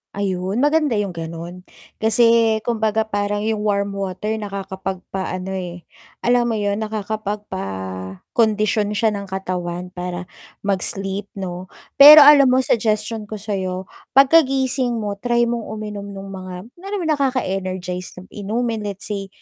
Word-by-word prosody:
Ayun, 195 +4 -1
maganda 295 -5 +2
yung 205 -2 -1
ganun. 170 +2 -7 0.3
Kasi 225 0 +4
kumbaga 220 -2 +1
parang 205 -1 -2
yung 220 0 0
warm 200 -1 0
water 200 +2 -3
nakakapagpaano 190 -1 -5
eh, 175 -2 -5 0.4
alam 240 0 +3
mo 230 - 0
yun 205 0 -1
nakakapagpakondisyon 210 - -2
siya 220 0 +2
ng 200 -1 -5
katawan 180 -2 -4
para 180 0 -5 0.4
mag-sleep 195 0 -2
'no. 185 -1 -5 0.3
Pero 295 +1 +12
alam 285 -1 +8
mo 255 +1 +3
suggestion 215 -2 0
ko 215 - -6
sayo, 190 -3 -3 0.3
pagkagising 270 -3 +4
mo 205 -2 -3
try 240 +1 +2
mong 235 -1 -2
uminom 210 -2 -6
nung 195 0 -8
mga 185 +3 -8
kunyari 390 +6 -7
nakaka-energize 190 - -2
na 180 - -10
inumin, 220 +1 -2
let's 200 -1 -6
say, 200 -1 -3
205 Hz, 125 wpm, -21 LUFS, 185-230 Hz, 0.4 s, Pero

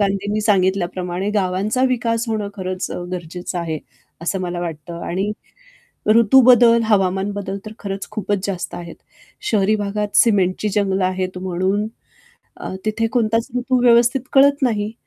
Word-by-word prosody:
गांधींनी 200 +1 0
सांगितल्याप्रमाणे 185 -2 0
गावांचा 200 +5 0
विकास 230 -2 0
होणं 215 -2 -2
खरंच 185 -2 -4
अ, - - -4
गरजेचं 175 +1 -5
आहे, 160 -2 -3 0.4
असं 185 +3 -1
मला 175 -1 -3
वाटतं 170 0 -6
आणि 190 +4 -1 0.8
ऋतू 230 +3 +6
बदल 235 -1 +6
हवामान 195 -2 +1
बदल 200 -1 -4
तर 215 - -7
खरंच 195 -1 -5
खूपच 205 -2 -2
जास्त 190 -3 -4
आहेत, 170 -1 -8 0.5
शहरी 210 +2 +2
भागात 205 0 -2
सिमेंटची 200 -2 +3
जंगलं 195 -2 +1
आहेत 185 0 -2
म्हणून 190 +3 -1 0.7
अ, - - -6
तिथे 225 +1 0
कोणताच 230 -1 +1
ऋतू 250 0 +1
व्यवस्थित 240 +2 +4
कळत 280 +1 +5
नाही 215 -3 0
200 Hz, 140 wpm, -20 LUFS, 185-220 Hz, 0.8 s, ऋतू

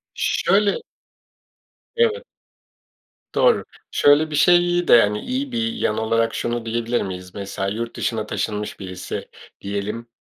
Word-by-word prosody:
Şöyle. 200 0 +2 1.2
Evet. 470 0 +2 1.1
Doğru. - - +4 0.3
Şöyle 145 +2 +4
bir - - -2
şeyi 175 +2 +4
de, 120 - +8
hani, 105 0 0
iyi 260 - -3
bir 230 -1 -1
yan 110 - -1
olarak 115 +1 +1
şunu 120 0 -2
diyebilir 115 +1 -1
miyiz? 90 -2 -6
Mesela, 100 -1 -4
yurt 115 +4 -4
dışına 110 -2 -2
taşınmış 105 0 -3
birisi 95 -2 -6 0.3
diyelim. 100 +4 -4
115 Hz, 125 wpm, -22 LUFS, -, 1.2 s, de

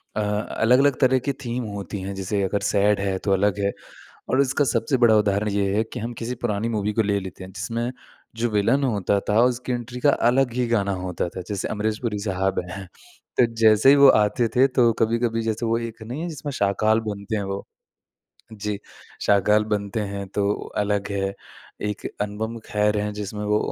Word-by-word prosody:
अ, 110 - 0
अलग-अलग 115 +6 +2
तरह 130 0 +4
की 140 - +1
थीम 120 +1 -2
होती 100 -1 -5
हैं। 95 +1 -4
जैसे 95 +1 -2
अगर 100 +2 -1
सैड 100 0 +2
है, 100 -1 -1
तो 100 - -2
अलग 100 +1 +1
है 100 0 +1 0.6
और 130 - +3
इसका 140 +2 +1
सबसे 135 +1 +1
बड़ा 120 -3 +5
उदाहरण 105 0 +1
ये 100 -1 0
है 110 - +3
कि - - -4
हम 115 +2 -4
किसी 120 +2 -3
पुरानी 105 +2 0
मूवी 105 -2 -1
को 110 - +2
ले 100 -1 +1
लेते 95 -1 -8
हैं, 95 - -10
जिसमें 115 +6 -3 0.5
जो 120 +1 0
विलेन 115 +6 +2
होता 100 -5 +1
था, 105 +2 +4
उसकी 125 0 0
एंट्री 120 +1 -5
का 145 - +5 0.2
अलग 125 -1 +2
ही 125 0 0
गाना 105 -4 +1
होता 90 -1 -2
था। 95 - -4
जैसे 100 -2 -2
अमरीश 105 0 -1
पुरी 110 -4 -2
साहब 95 -2 -1
हैं, 95 -1 -7 0.5
तो 125 - +6 0.2
जैसे 110 +3 +6
ही 140 - +8
वो 140 -1 +8
आते 105 +3 +1
थे, 130 +2 +6
तो 125 -3 +3
कभी-कभी 115 0 +1
जैसे 110 +1 -2
वो 115 +1 +2
एक 115 -1 -7
नहीं 125 +7 -5
है, 175 - -3
जिसमें 150 -2 -5
शाकाल 110 +2 +3
बनते 100 +2 -4
हैं 100 - -2
वो? 100 0 -4 0.9
जी, 105 -1 -4 0.4
शाकाल 105 +1 +3
बनते 100 +2 -3
हैं, 100 0 -4
तो 100 +1 0 0.3
अलग 105 -1 0
है। 100 0 -1 0.5
एक 105 -1 -3 0.2
अनुपम 110 +3 -4
खेर 105 0 +1
हैं, 105 0 -2
जिसमें 105 0 -5
वो 105 0 +2
105 Hz, 200 wpm, -23 LUFS, 100-120 Hz, 0.9 s, ही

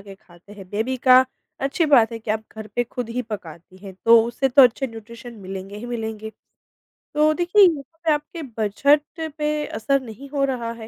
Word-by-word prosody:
के 195 0 -12
खाते 180 +1 -19
हैं, 195 -3 -12
बेबी 230 +5 -2
का 255 0 +8 0.4
अच्छी 275 +5 0
बात 240 -6 +5
है 230 - -5
कि 220 -1 -6
आप 220 0 -1
घर 220 -1 -8
पे 245 - +2
खुद 240 0 -6
ही 250 +2 -3
पकाती 185 -5 -9
हैं, 190 - -9
तो 230 0 +7
उसे 245 +3 -1
तो 270 +2 +7
अच्छे 255 +2 +3
न्यूट्रिशन 230 +1 -11
मिलेंगे 195 +1 -7
ही 230 +3 -7
मिलेंगे। 220 -2 -5 0.9
तो 305 +1 +4
देखिए, 355 +5 +4
यहाँ 320 -1 -1
पे 315 - +4
आपके 300 +3 -5 0.2
बजट 280 +8 +3 0.4
पे 300 0 -1
असर 275 +4 0
नहीं 260 +3 -11
हो 280 -1 -1
रहा 240 -4 -3
है 225 -1 -10
235 Hz, 200 wpm, -22 LUFS, 215-275 Hz, 0.9 s, का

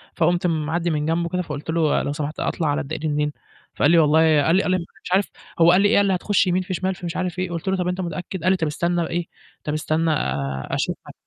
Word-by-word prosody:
فقمت 175 +2 +2
معدّي 165 +1 -1
من 150 -1 -1
جنبه 170 +1 0
كده، 180 +1 -1
فقلت 150 -2 -7
له: 160 -2 +2
"لو 145 - -2
سمحت 150 +1 -4
أطلع 160 - -1
على 145 +1 0
الدائري 150 +2 -4
منين؟" 150 0 0 0.4
فقال 145 - +3
لي: 170 - +5
"والله" 155 -1 +5 0.3
قال 165 - +3
لي 195 - +3
قال 185 - 0
لي 185 - +3 0.3
مش - - -8
عارف 195 +1 +4 0.3
هو 170 +1 +7
قال 180 - +5
لي 205 - +5
إيه، - - +3
قال 200 - +4
لي: 190 - +2
"هتخش 200 +1 +1
يمين 180 +1 +2
في 185 - -5
شمال، 190 +1 -1
في 180 -1 -9
مش 170 - -4
عارف 180 -1 -3
إيه" 185 0 -1
قلت 170 +2 -5
له: 190 0 +1
"طَب 180 -1 -1
أنت 180 +1 -2
متأكد؟" 180 0 -5
قال 185 - +4
لي: 190 - +2
"طَب 165 -3 -1
استنى 170 +2 -1
إيه 175 +1 -2 0.4
طَب 150 - -3
استنى 155 +2 0
آآ، 70 - -2
أشوفها - - -2
على - - -11
170 Hz, 270 wpm, -22 LUFS, 155-180 Hz, 0.4 s, هو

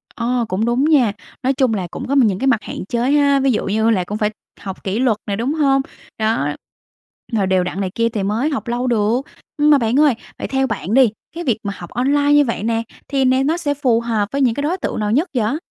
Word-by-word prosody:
Ờ, 240 0 0
cũng 190 +4 -1
đúng 240 +4 +1
nha! 270 -9 +4 0.3
Nói 265 - +2
chung 260 -4 +1
là 185 -4 -2
cũng - - -6
có 275 - 0
những 215 -9 +3
cái 270 - 0
mặt 230 -5 +2
hạn - - -6
chế 240 +5 0
ha, 285 -1 +4
ví 270 0 +2
dụ 220 - -1
như 220 +3 +1
là 195 -5 +2
cũng 210 +4 -5
phải 210 -1 +1 0.3
học 190 -1 -8
kỷ 200 +4 -2
luật 240 -5 +2
nè, 200 - -1
đúng 240 +7 -1
hông? 275 -3 +2 0.4
Đó 220 -9 0 0.9
rồi 200 -4 +1
đều 185 -1 +2
đặn 185 +2 -4
này 185 -1 -2
kia 230 0 +1
thì 215 -4 -3
mới 225 +9 0
học 275 -4 -4
lâu 245 +2 -1
được. 225 +1 +1 0.4
Mà 295 0 +5
bạn 240 +2 +1
ơi, 300 -3 +5 0.3
vậy - - -3
theo 265 0 0
bạn 215 -1 -3
đi, 260 -2 +6 0.3
cái 345 - -4
việc 240 -8 +1
mà 200 -1 -3
học 175 - -9
online 285 +4 +2
như 290 0 +5
vậy 230 -4 -3
nè, 225 0 0 0.2
thì 275 -2 +1
nè 260 +1 +3
nó 315 +4 +1
sẽ 295 -5 -1
phù 255 -5 +1
hợp 225 -3 -1
với 280 0 -1
những 240 -4 +2
cái 285 - -3
đối 335 +5 0
tượng 345 - -3
nào 210 0 -1
nhất 300 +10 +2
vậy? 230 +4 +1
240 Hz, 255 wpm, -19 LUFS, 215-275 Hz, 0.9 s, đi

